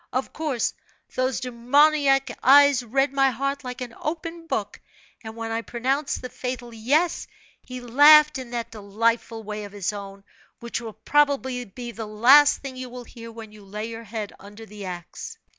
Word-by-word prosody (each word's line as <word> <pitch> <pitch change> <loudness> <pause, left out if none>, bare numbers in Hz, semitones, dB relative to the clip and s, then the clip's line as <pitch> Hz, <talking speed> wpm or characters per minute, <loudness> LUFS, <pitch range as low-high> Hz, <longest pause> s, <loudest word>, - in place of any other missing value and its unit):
Of 255 +2 -3
course, 295 -7 -1 0.4
those 255 +1 -1
demoniac 270 +2 +3
eyes 280 0 +6
read 270 +4 0
my 270 -1 +4
heart 275 +3 -3
like 250 0 -7
an 245 -2 -6
open 330 +1 -5
book; - - -3 0.4
and 220 0 -8
when 225 0 -5
I 225 0 -1
pronounced 260 +6 -2
the 250 - -5
fatal 250 -2 -6
'yes,' 285 +10 0 0.3
he 255 0 -8
laughed 295 +4 +6
in 255 -2 -8
that 235 -1 -4
delightful 225 +2 -1
way 210 0 -5
of 205 -1 -10
his 205 0 -2
own, 200 -1 -9 0.4
which 235 0 -4
will 225 -2 -7
probably 265 0 +1
be 240 +4 -8
the 225 -1 -7
last 260 +9 +5
thing 265 -2 -7
you 255 -1 -6
will 245 0 -8
hear 230 -1 -11
when 225 -1 -10
you 210 -1 -15
lay 210 +3 -6
your 230 0 -8
head 215 -1 -5
under 205 +3 -12
the 210 -2 -9
axe. 175 -2 -8
245 Hz, 175 wpm, -24 LUFS, 220-275 Hz, 0.4 s, eyes